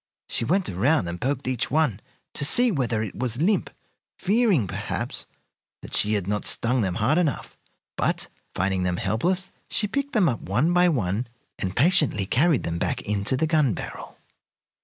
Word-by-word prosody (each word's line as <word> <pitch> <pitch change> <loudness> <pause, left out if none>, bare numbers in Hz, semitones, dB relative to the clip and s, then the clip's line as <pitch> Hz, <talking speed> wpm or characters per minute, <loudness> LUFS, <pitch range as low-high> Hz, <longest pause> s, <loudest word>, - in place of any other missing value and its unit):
She - - 0
went 185 - +1
around 125 - +1
and 85 +1 -5
poked 135 0 -1
each 130 -3 -1
one 145 -9 +1 0.3
to - - 0
see 240 - +4
whether 120 - 0
it 105 - -5
was 120 0 -2
limp, 195 +6 +1 0.5
fearing, 200 - +2
perhaps, 90 - -4 0.6
that - - -10
she 105 - +3
had 100 -4 0
not 105 +2 -1
stung 125 +2 +1
them 95 -4 -1
hard 145 +10 +2
enough; 155 -8 -2 0.4
but, - - 0 0.3
finding 95 0 0
them 90 -1 0
helpless, 175 - 0 0.2
she 215 - +2
picked 280 +7 -2
them 205 -6 +4
up 120 -6 -1
one 130 - +1
by 180 0 +5
one 110 - -1 0.3
and 95 -1 -3
patiently 150 - +3
carried 150 - +2
them 85 0 -3
back - - -1
into 105 +4 0
the 160 - +1
gun 155 - +2
barrel. - - -8
130 Hz, 175 wpm, -25 LUFS, 105-170 Hz, 0.6 s, by